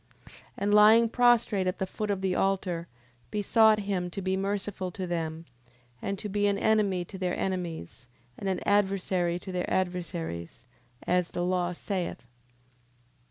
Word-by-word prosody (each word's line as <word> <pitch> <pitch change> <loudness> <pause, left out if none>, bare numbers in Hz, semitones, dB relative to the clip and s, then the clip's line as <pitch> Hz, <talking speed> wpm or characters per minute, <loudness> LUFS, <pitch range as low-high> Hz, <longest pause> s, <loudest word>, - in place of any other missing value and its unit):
And 205 +1 0
lying 220 +2 +7
prostrate 235 -5 +3
at 185 - -1
the 190 - -1
foot 210 +3 -4
of 200 -2 -1
the 190 -1 0
altar, 185 -3 0 0.4
besought 215 +1 +4
him 190 -3 -2
to 175 - -6
be 190 0 0
merciful 195 -1 -2
to 185 +1 -5
them, 165 -2 -3 0.6
and 200 - -2
to 210 - -5
be 205 0 +1
an 200 0 +1
enemy 200 -4 +2
to 190 - -10
their 180 -1 -1
enemies, 170 - -4 0.3
and 195 - -3
an 185 - -1
adversary 190 -3 +1
to 190 +1 -8
their 180 -1 -2
adversaries, 170 - -3 0.4
as 180 -1 +1
the 175 - -3
law 180 -1 0
saith. 180 - -4
190 Hz, 155 wpm, -28 LUFS, 180-205 Hz, 0.6 s, lying